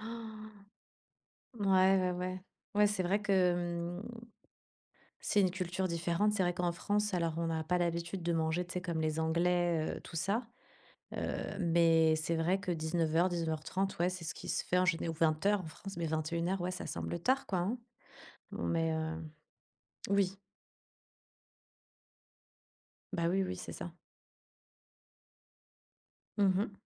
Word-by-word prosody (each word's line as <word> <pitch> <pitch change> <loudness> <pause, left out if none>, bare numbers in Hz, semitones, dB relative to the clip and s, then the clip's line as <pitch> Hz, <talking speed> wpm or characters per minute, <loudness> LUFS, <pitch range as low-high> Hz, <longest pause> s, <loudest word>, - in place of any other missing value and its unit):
Han! 220 -1 -7 1.1
Ouais 205 - -1 0.3
ouais 185 0 +1
ouais. 185 +1 -3 0.3
Ouais, 210 0 +6
c'est 205 -2 0
vrai 195 +4 +2
que, 205 - +1
hem, 175 -1 +1 1.2
c'est 205 - +2
une 185 -2 +3
culture 185 0 -2
différente. 170 +5 +1
C'est 195 - +2
vrai 175 0 +1
qu'en 175 -1 0
France 210 +4 0
alors, 170 -3 +1
on 170 0 0
a 160 -1 -1
pas 180 +3 +1
l'habitude 170 +1 -1
de 170 0 +1
manger, 160 +2 +1
tu 175 - -8
sais, 180 - -2
comme 170 -3 -2
les 155 0 0
Anglais, 170 0 +1
heu, - - -7
tout - - -11
ça. 195 +8 0 0.7
Heu, - - -3
mais 165 -2 +4
c'est 155 +1 -1
vrai 175 +4 +2
que 195 -2 -2
19:00, 165 +1 +1
19:30 170 +3 -1
ouais, 175 +1 +2
c'est 180 -2 -6
ce 165 - -3
qui - - -8
se - - 0
fait 180 - +2
en 180 - +4
géné 170 -2 +1
ou - - -1
20:00, 165 +6 +2
en 165 - -8
France. 195 +4 -9
Mais 170 - -1
21:00, 170 +4 -1
ouais 180 - -1
ça 185 - -5
semble 170 - -3
tard, 260 +9 +2
quoi. 185 - 0
Hein? 200 +8 0 0.8
Non - - -4
mais, 165 -1 +1
heu, 160 +1 -2 0.9
oui. 200 -1 +2 2.8
Bah, 170 -3 +1
oui, 190 +2 +2
oui, 185 0 -3
c'est - - -7
ça. 175 - -6 2.5
Mmh 205 - +4
mh. 205 0 -1
175 Hz, 155 wpm, -33 LUFS, 165-190 Hz, 2.8 s, Ouais